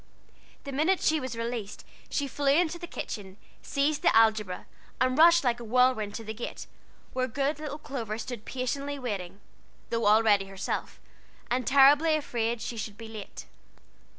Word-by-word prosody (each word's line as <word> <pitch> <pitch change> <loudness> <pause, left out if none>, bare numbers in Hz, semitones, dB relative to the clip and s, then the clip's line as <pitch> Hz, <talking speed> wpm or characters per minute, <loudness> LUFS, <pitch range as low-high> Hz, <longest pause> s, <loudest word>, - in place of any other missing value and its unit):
The 280 - -6
minute 315 +7 +2
she 315 0 +2
was 255 -3 -5
released 230 -3 -4 0.2
she 285 - -1
flew 280 +2 -3
into 345 +3 +2
the 345 - -7
kitchen, 195 - -6 0.2
seized 290 +2 0
the - - +3
algebra, 215 -4 +3 0.3
and 255 0 +2
rushed 335 +2 +6
like 240 -2 +1
a - - -7
whirlwind 230 -3 +2
to 225 - -5
the 220 0 -5
gate, 230 +2 -6 0.5
where 255 0 0
good 280 +4 -1
little 295 -1 -5
Clover 240 -8 -5
stood 230 -1 -6
patiently 275 +3 -3
waiting, 200 -7 -5 0.5
though 230 -1 0
all 215 +2 +6
ready 205 -3 +4
herself, 195 0 -4 0.5
and 250 -1 0
terribly 285 +4 +6
afraid 235 -6 -2
she 235 - -5
should 215 -1 -5
be 225 - -9
late. 215 -3 -9
245 Hz, 165 wpm, -28 LUFS, 220-285 Hz, 0.5 s, rushed